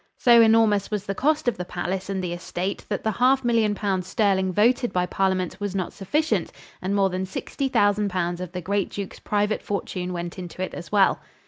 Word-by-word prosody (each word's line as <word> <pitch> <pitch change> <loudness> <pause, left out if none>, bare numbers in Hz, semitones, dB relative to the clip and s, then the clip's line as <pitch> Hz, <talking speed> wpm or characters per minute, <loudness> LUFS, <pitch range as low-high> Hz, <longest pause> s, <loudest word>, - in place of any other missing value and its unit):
So 235 -1 +6
enormous 220 -3 +4
was 210 -2 -3
the 195 - -2
cost 295 +5 +1
of 245 - +1
the 180 - -3
palace 185 +2 -4
and 190 -2 -2
estate 175 +2 -4
that 205 - -2
the 220 - +1
half 255 +5 +3
million 225 -3 +2
pounds 190 -3 -1
sterling 190 -2 +1
voted 235 +5 +2
by 180 0 +1
parliament 185 -1 -1
was 205 -2 -3
not 185 -3 -2
sufficient 300 +11 0 0.3
and 190 +2 -1
more 195 -1 +2
than 185 +1 -2
sixty 270 +8 -3
thousand 205 -3 +2
pounds 175 -1 -2
of 180 -2 -6
the 180 0 -5
great 200 +2 -1
Duke's 200 -2 -6
private 210 +1 0
fortune 185 -2 -3
went 175 +1 -5
into 180 +1 -5
it - - -5
as 175 - -8
well. 200 -2 +4
195 Hz, 205 wpm, -24 LUFS, 185-215 Hz, 0.3 s, So